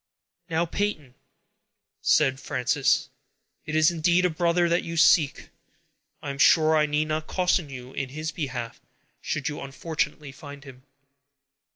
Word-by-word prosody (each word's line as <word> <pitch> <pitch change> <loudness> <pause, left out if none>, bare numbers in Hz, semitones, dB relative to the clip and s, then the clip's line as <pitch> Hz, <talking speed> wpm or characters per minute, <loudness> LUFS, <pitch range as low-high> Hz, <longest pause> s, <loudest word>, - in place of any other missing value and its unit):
"Now, 165 +1 +1
Peyton," 165 -8 -3 0.9
said 135 -4 +3
Frances, 130 +1 0 0.6
"it 155 - -3
is 155 +2 +5
indeed 175 +2 +2
a 180 - +2
brother 170 +2 +1
that 170 +1 +2
you 165 0 -5
seek; 160 -3 +3 0.7
I 145 - -3
am 140 - -9
sure 160 +2 +5
I 150 -1 +3
need 150 +1 0
not 155 0 -3
caution 180 -4 0
you 130 -1 -9
in 135 - -4
his 155 +3 -5
behalf, 125 -7 -5 0.4
should 145 -4 -3
you 150 - -4
unfortunately 145 +1 -4
find 145 0 -11
him." 130 -3 -13
155 Hz, 145 wpm, -25 LUFS, 140-165 Hz, 0.9 s, is